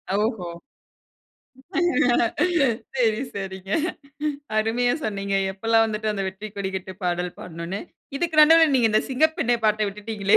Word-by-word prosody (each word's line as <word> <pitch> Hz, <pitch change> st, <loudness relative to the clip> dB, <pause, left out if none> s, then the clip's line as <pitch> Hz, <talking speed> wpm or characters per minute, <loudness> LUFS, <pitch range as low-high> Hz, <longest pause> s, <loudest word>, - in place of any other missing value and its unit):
ஓஹோ! 210 Hz, -4 st, -1 dB, 2.5 s
சரி. 225 Hz, -3 st, +2 dB, 0.2 s
சரிங்க. 190 Hz, -1 st, -6 dB, 0.9 s
அருமையா 235 Hz, +3 st, +2 dB
சொன்னீங்க. 200 Hz, -2 st, -2 dB, 0.2 s
எப்பெல்லாம் 225 Hz, +3 st, +3 dB
வந்துட்டு 215 Hz, 0 st, -2 dB
அந்த 195 Hz, -1 st, -3 dB
வெற்றிக்கொடி 200 Hz, 0 st, -6 dB
கட்டு 190 Hz, 0 st, -5 dB
பாடல் 180 Hz, 0 st, -1 dB
பாடணும்னு. 170 Hz, +3 st, -6 dB, 0.4 s
இதுக்கு 315 Hz, 0 st, +2 dB
நடுவுல 325 Hz, -1 st, +6 dB
நீங்க 235 Hz, -3 st, +4 dB
இந்த 215 Hz, -, +3 dB
சிங்கப்பெண்ணே 310 Hz, -3 st, +2 dB
பாட்ட 215 Hz, 0 st, +3 dB
விட்டுட்டீங்களே? 205 Hz, 0 st, +1 dB
215 Hz, 110 wpm, -24 LUFS, 195-235 Hz, 2.5 s, நடுவுல